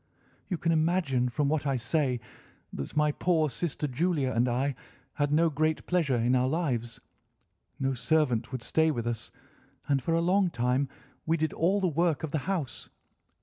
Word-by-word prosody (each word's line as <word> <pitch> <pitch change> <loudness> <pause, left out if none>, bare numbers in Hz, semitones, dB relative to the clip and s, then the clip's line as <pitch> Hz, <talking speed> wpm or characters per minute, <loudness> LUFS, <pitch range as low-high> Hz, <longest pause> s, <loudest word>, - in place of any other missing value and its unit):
"You 180 - -1
can 165 - 0
imagine 155 -6 +1
from 140 +4 0
what 150 0 0
I 135 - +1
say 125 +1 0 0.5
that 70 - -6
my 150 0 +4
poor 160 -2 +1
sister 150 +1 -2
Julia 145 0 0
and 120 +2 +2
I 135 +4 0 0.4
had 145 -1 0
no 165 +2 +3
great 155 +2 0
pleasure 165 -7 +1
in 120 +2 +2
our 125 0 +2
lives. 130 -7 -2 0.8
No 135 0 0
servant 130 -3 +1
would 130 -2 -5
stay 160 +5 +2
with 120 -7 -2
us, 120 -2 -3 0.6
and 140 -2 +2
for 165 +6 0
a - - +3
long 185 +2 +3
time 125 0 0 0.4
we 165 +1 +2
did 160 0 -1
all 190 +5 +2
the 190 - +1
work 165 -1 +1
of 160 - -3
the 155 - 0
house. 165 -10 -3
150 Hz, 180 wpm, -29 LUFS, 125-165 Hz, 0.8 s, my